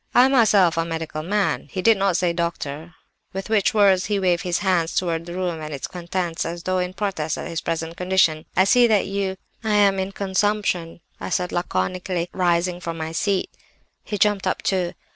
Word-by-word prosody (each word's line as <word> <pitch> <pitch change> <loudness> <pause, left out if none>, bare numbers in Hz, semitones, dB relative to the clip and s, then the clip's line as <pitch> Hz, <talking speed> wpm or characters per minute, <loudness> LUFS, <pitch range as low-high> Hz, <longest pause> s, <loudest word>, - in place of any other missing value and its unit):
'I 250 - +8
am 265 - +2
myself 205 -9 +4
a 165 - +2
medical 160 -2 -4
man' 200 +5 -1
(he 185 - -4
did 225 -1 +6
not 195 -3 +1
say 175 -2 +1
'doctor'), 165 -1 -4 0.4
with 195 +3 -5
which 215 -1 +2
words 195 -3 +4
he 205 -1 0
waved 180 -2 +2
his 175 -2 -1
hands 175 -3 +1
towards 170 -2 -1
the 175 - -6
room 175 -3 -2
and 155 0 -6
its 140 -2 -4
contents 175 -1 -3
as 170 +1 -5
though 185 0 0
in 180 0 -2
protest 175 -7 -2
at - - -5
his 165 - -4
present 165 0 -3
condition. 180 -4 +1
'I 190 - +7
see 240 +5 +5
that 215 -3 +3
you—' 195 -1 -2 0.3
"'I'm 205 -3 +3
in 190 +1 -2
consumption,' 195 -4 -1 0.2
I - - -5
said 180 -1 -1
laconically, 175 - -2
rising 175 -1 +1
from 165 -2 -5
my 160 0 -4
seat. 195 +3 -1 0.5
"He 210 - -4
jumped 205 -1 +2
up, - - -1
too. 180 -3 0
180 Hz, 200 wpm, -22 LUFS, 170-195 Hz, 0.5 s, I